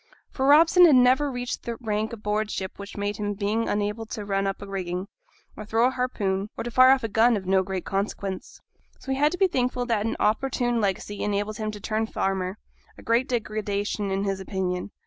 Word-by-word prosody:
For 265 0 -1
Robson 330 +5 +7
had 295 - +6
never 255 +3 +4
reached 245 -1 -4
that 235 -1 -4
rank 215 -2 -2
aboard 215 -1 -2
ship 190 -2 -5
which 200 +1 -9
made 205 0 -2
his 205 -1 -3
being 215 +3 0
unable 210 +2 -2
to 215 -2 -6
run 195 -1 0
up 195 - -2
the 200 - -9
rigging, 185 -1 -4 0.5
or 215 - -7
to 210 - -16
throw 225 +2 +3
a 255 - +3
harpoon, 210 -6 -1
or - - -3
to 240 - -5
fire 255 +2 +7
off 265 -1 +4
a - - 0
gun, 225 +2 +3
of 190 - -7
no 190 +1 +3
great 190 -1 -4
consequence; 195 -1 -4 0.4
so 270 - -6
he 265 - 0
had 295 +1 +4
to 360 - -4
be 390 - +4
thankful 250 -5 -1
that 225 -3 0
an - - -2
opportune 240 +1 +1
legacy 205 +1 -2
enabled 205 +1 -1
him 215 -1 -3
to 210 -1 -7
turn 220 +2 -1
farmer, 190 -1 -2 0.4
a - - -13
great 235 +3 +1
degradation 210 -3 -2
in 195 +1 -1
his 195 -1 -1
opinion. 185 -1 -3
215 Hz, 220 wpm, -25 LUFS, 200-245 Hz, 0.5 s, Robson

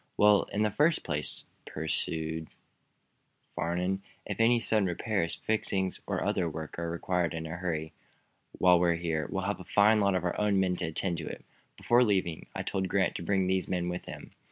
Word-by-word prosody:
"Well, 105 -1 +5
in 105 - +1
the 105 - +1
first 155 +8 +2
place," 75 -2 -4 0.2
pursued 80 +1 -3 1.1
Farnum, 90 +4 -1 0.2
"if 105 - -5
any 120 +1 +5
sudden 110 -3 +2
repairs, 90 -1 -1
fixings 95 -4 -1
or - - -1
other 85 -3 0
work 80 +1 -6
are 85 0 -2
required 85 0 -1
in 80 0 -4
a 80 - -6
hurry, 80 -3 -3 0.6
while 90 -1 +5
we're 85 -1 +3
here, 80 -3 -2
we - - -2
have - - -2
a - - -8
fine 105 +2 +4
lot 100 -2 +3
of 90 - 0
our 90 - -1
own 105 -2 +2
men 95 -1 +2
to - - -2
attend 85 +2 -2
to 75 - -6
it. - - -7 0.3
Before 120 +1 +4
leaving 95 -7 0
I - - -2
told 95 -1 -1
Grant 100 -1 +2
to - - -6
bring 95 +2 +1
these 95 0 0
men 90 -1 -1
with 90 0 -4
him. - - -9
90 Hz, 195 wpm, -30 LUFS, 85-100 Hz, 1.1 s, Well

